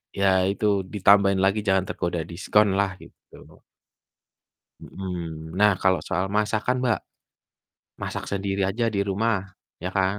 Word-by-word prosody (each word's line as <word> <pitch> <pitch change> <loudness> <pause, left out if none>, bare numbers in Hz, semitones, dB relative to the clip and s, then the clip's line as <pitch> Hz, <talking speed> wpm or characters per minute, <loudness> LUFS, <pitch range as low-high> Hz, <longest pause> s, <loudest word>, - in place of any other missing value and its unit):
ya 95 -1 +3
itu 105 - -3 0.3
ditambahin 100 -1 +4
lagi 100 +2 +2
jangan 95 -1 +3
tergoda 85 -1 -2
diskonlah 100 +2 +1
gitu. - - -18 1.2
Mhm. 85 -4 -6
Nah 105 0 +6
kalau 95 -3 +3
soal 90 +3 -1
masakan, 110 +4 0
Mbak, 120 -3 +2 1.0
masak - - -4
sendiri 100 0 -1
aja 115 +3 -1
di 100 - 0
rumah, 95 -2 -1 0.2
iya 90 - -3
kan? 95 +2 +1
95 Hz, 125 wpm, -24 LUFS, 95-105 Hz, 1.2 s, Nah